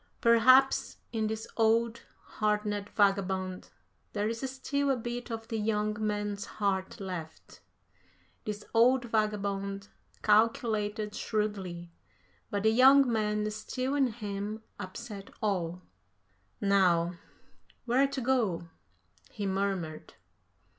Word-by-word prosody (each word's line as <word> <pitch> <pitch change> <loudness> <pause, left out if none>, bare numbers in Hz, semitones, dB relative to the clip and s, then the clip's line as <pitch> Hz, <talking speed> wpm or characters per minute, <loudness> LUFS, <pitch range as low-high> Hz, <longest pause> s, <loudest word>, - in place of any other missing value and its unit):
"Perhaps 255 +3 +5 0.2
in 220 -1 0
this 220 0 -3
old, 230 +1 +2 0.2
hardened 210 -1 -1
vagabond 190 -2 +1 0.4
there 210 0 0
is 225 +1 -3
still 280 +2 -1
a 270 - +3
bit 240 +1 -5
of 225 -1 -5
the 225 - -2
young 210 0 0
man's 205 -1 -2
heart 195 -2 -1
left. 180 -5 -7 0.8
This 210 0 -5
old 245 +2 +4
vagabond 200 -3 -1 0.3
calculated 215 -1 +2
shrewdly, 190 -6 -3 0.6
but 205 -2 -2
the 220 - +5
young 260 +1 +6
man 210 -1 0
still 255 +5 -3
in 280 -2 +3
him 210 -1 -5 0.2
upset 205 +1 -7
all.... 180 -4 -1 0.8
Now, 180 -3 +2 0.7
where 255 +3 +3
to 275 -1 -4
go?" 225 -10 0 0.6
he 205 -3 -5
murmured. 190 -5 -2
210 Hz, 105 wpm, -30 LUFS, 200-230 Hz, 0.8 s, young